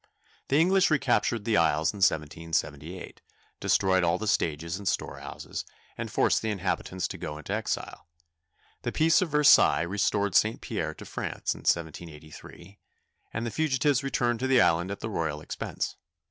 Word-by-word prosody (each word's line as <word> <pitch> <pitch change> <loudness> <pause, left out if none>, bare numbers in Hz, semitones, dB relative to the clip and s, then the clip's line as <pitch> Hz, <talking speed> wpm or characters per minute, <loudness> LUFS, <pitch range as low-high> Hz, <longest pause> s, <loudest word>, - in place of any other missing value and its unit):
The 140 - +2
English 185 +2 +4
recaptured 120 -7 +1
the 110 -3 +2
isles 80 0 +2
in - - -9
1778, 80 -1 -2 0.4
destroyed 95 -1 +2
all 85 +1 +2
the 110 - -5
stages 85 -3 -1
and 100 - -7
store 95 - -2
houses, - - -7 0.3
and - - -5
forced - - +2
the 110 - -2
inhabitants 95 -2 -2
to - - -7
go 75 - -5
into 75 - -5
exile. - - -4 0.7
The - - -3
peace 160 +1 +3
of 185 - 0
Versailles 150 0 +5
restored 100 +2 0
St. 110 +1 +3
Pierre - - -4
to - - -11
France - - -3
in - - -12
1783, 80 +3 -4 0.5
and 115 +2 -3
the 115 - -3
fugitives 145 -2 +1
returned 120 -4 0
to 130 - -1
the 130 -1 +4
island 85 0 +3
at 100 - -6
the 110 - -3
royal 80 -5 -2
expense. 75 - -5
100 Hz, 160 wpm, -27 LUFS, 85-120 Hz, 0.7 s, Versailles